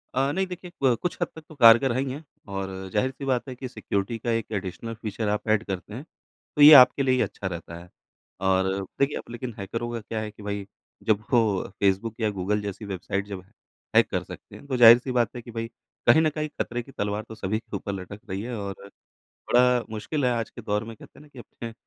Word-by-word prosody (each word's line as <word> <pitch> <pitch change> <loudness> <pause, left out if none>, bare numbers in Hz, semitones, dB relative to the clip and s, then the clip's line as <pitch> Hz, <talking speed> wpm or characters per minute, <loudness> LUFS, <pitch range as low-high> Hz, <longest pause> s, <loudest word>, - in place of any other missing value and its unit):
अ, 135 +2 +2
नहीं। 190 +5 0
देखिए, 180 0 -8
क 130 -3 +5
कुछ 180 - -2
हद 175 - +2
तक 160 - -9
तो 155 - -12
कारगर 120 0 +7
है 120 - 0
ही 135 -1 -2
है। 145 +4 -7 0.2
और 95 -1 -4 0.2
ज़ाहिर 130 +5 +1
सी 140 +1 -8
बात 130 -1 0
है 130 - -6
कि 130 +1 -6
सिक्योरिटी 110 -2 -3
का 120 +2 -2
एक 115 -1 -2
एडिशनल 105 +3 -4
फ़ीचर 110 -1 -4
आप 105 +2 -2
एड 110 0 +3
करते 95 0 -6
हैं, 125 +5 -6 0.5
तो 150 - +1
ये 150 +2 +11
आपके 135 +2 +3
लिए 130 -1 +3
ही 130 - +2
अच्छा 100 -1 -3
रहता 85 -2 -6
है। 90 +1 -14 0.6
और 95 0 +3 0.3
देखिए, 140 +1 +2
अब - - -6
लेकिन 120 0 -5
हैकरों 115 +4 -4
का 115 - -3
क्या 110 +1 -4
है 105 -1 -5
कि 105 0 -14
भई 100 -1 -4 0.4
जब 110 -1 +1
वो 110 -6 +2
फेसबुक 100 +3 +1
या 110 -2 +1
गूगल 105 +1 -1
जैसी 105 +1 -6
वेबसाइट 100 0 -3
जब 100 -2 -6 0.5
हैक - - +5
कर - - -1
सकते - - -11
हैं - - -13
तो 130 -2 -1
ज़ाहिर 120 -1 +10
सी 125 +2 -5
बात 120 -1 +1
है 120 - -5
कि 120 - -11
भई 115 0 -4 0.4
कहीं 120 +7 +7
न 155 - +3
कहीं 155 0 -4
ख़तरे 120 +1 -3
की 135 - -15
तलवार 105 -2 -2
तो 110 - -8
सभी 110 +1 -2
के - - -9
ऊपर 100 - -5
लटक 100 +2 -7
रही 95 +1 -3
है। 120 +2 -5
और 100 -1 -5 0.8
बड़ा 125 0 +4
मुश्किल 130 +7 -3
है 125 - +3
आज 115 -2 -2
के - - -10
दौर 105 +1 -1
में 115 0 -8
कहते - - -16
हैं - - -14
ना, 150 - -17
कि 135 - -16
अपने 115 -1 -9
115 Hz, 245 wpm, -26 LUFS, 100-125 Hz, 0.8 s, ये